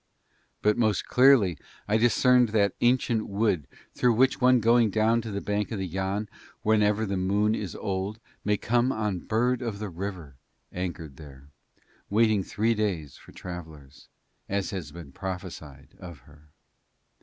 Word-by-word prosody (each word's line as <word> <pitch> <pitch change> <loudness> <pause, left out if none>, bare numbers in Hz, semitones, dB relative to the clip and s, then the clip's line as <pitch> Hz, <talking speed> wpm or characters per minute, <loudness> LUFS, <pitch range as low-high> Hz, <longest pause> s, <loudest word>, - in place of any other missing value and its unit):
But 105 +2 +2
most 110 -4 +1
clearly 125 - +4 0.3
I 105 +1 +2
discerned 125 +1 +4
that 100 -3 +2
ancient 120 -2 +2
wood 100 -8 0 0.3
through 125 -1 +2
which 130 +4 +2
one 125 0 +5
going 115 0 +4
down 110 +3 +2
to 115 - -7
the 100 -1 -4
bank 105 0 -2
of 110 - -3
Yann 95 +3 -2 0.4
whenever 105 0 +2
the 100 -2 -2
moon 100 +3 +1
is 100 -4 -4
old 100 +1 -3 0.2
may 105 0 +1
come 120 +5 +1
on 105 -6 -2
Bird 120 +6 0
of 115 -4 -4
the 105 0 -5
River 85 -6 -7 0.4
anchored 85 -6 -5
there, 70 -2 -13 0.6
waiting 110 -1 +3
three 110 +5 0
days 95 - -2
for - - -16
travellers, 80 -7 -10 0.4
as 100 -1 -1
has 90 -7 -5
been 80 -3 -11
prophesied 90 -7 -7
of 85 -7 -10
her. 75 +3 -20
100 Hz, 150 wpm, -27 LUFS, 90-110 Hz, 0.6 s, one